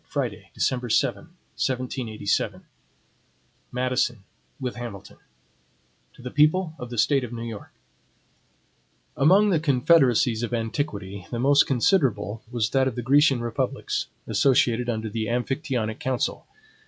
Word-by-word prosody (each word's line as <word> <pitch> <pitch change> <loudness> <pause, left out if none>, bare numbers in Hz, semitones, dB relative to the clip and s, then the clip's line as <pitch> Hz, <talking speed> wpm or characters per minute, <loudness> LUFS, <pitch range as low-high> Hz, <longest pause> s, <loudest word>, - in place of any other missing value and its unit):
Friday, - - -4
December 125 -2 -1
7, - - +1 0.3
1787 125 -5 -2 1.1
MADISON, 125 -3 -1 0.4
with 125 -2 -4
HAMILTON 115 -5 -8 1.0
To - - -15
the 125 - -6
People 155 +3 +3
of 125 -2 -7
the 120 - -6
State 135 +4 +3
of 120 - -6
New 115 -1 -5
York: 115 -3 -7 1.5
AMONG 195 +8 +5
the 165 - +3
confederacies 130 -5 +3
of 120 0 -2
antiquity, 105 -5 -4
the 120 - -4
most 140 +4 +4
considerable 120 - +1
was 120 -3 -1
that 135 -1 +3
of 130 - -3
the 120 - -4
Grecian 135 0 +4
republics, 120 -1 -2 0.2
associated 125 -3 +2
under 110 -1 -2
the 110 +1 -3
Amphictyonic 125 -2 -2
council. 130 -2 -2
125 Hz, 125 wpm, -25 LUFS, 115-135 Hz, 1.5 s, AMONG